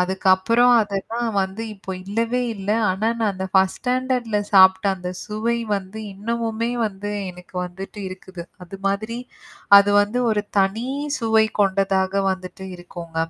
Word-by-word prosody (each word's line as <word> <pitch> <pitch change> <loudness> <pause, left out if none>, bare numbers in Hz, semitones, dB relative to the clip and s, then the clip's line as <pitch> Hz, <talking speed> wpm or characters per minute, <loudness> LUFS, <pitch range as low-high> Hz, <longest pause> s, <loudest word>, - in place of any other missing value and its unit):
அதுக்கப்புறம் 190 +6 +3
அதெல்லாம் 225 +3 -2
வந்து 190 +4 -5
இப்போ 195 -1 -9
இல்லவே 230 +5 -1
இல்ல. 200 0 -4 0.2
ஆனா 195 +4 0
நான் 220 -2 +1
அந்த 190 0 -4
ஃபர்ஸ்ட் 190 -1 +3
ஸ்டாண்டர்ட்ல 250 -3 0
சாப்பிட்ட 190 0 +6
அந்த 180 -1 -6 0.2
சுவை 220 +3 -1 0.2
வந்து, 195 +2 -7
இன்னமுமே 230 +2 -2 0.2
வந்து 205 0 -6 0.2
எனக்கு 180 +1 -15
வந்துட்டு 190 +3 -9
இருக்குது. 185 -1 -9 0.2
அது 180 +2 -9
மாதிரி, 215 +4 -1 0.6
அது 200 0 +3
வந்து 210 +4 -2
ஒரு 210 -1 +1 0.2
தனி 195 +4 +1 0.3
சுவை 220 -2 +3 0.2
கொண்டதாக 195 0 +1
வந்துட்டு 185 0 -8
இருக்குங்க. 175 -2 -10
200 Hz, 135 wpm, -22 LUFS, 190-225 Hz, 0.6 s, சாப்பிட்ட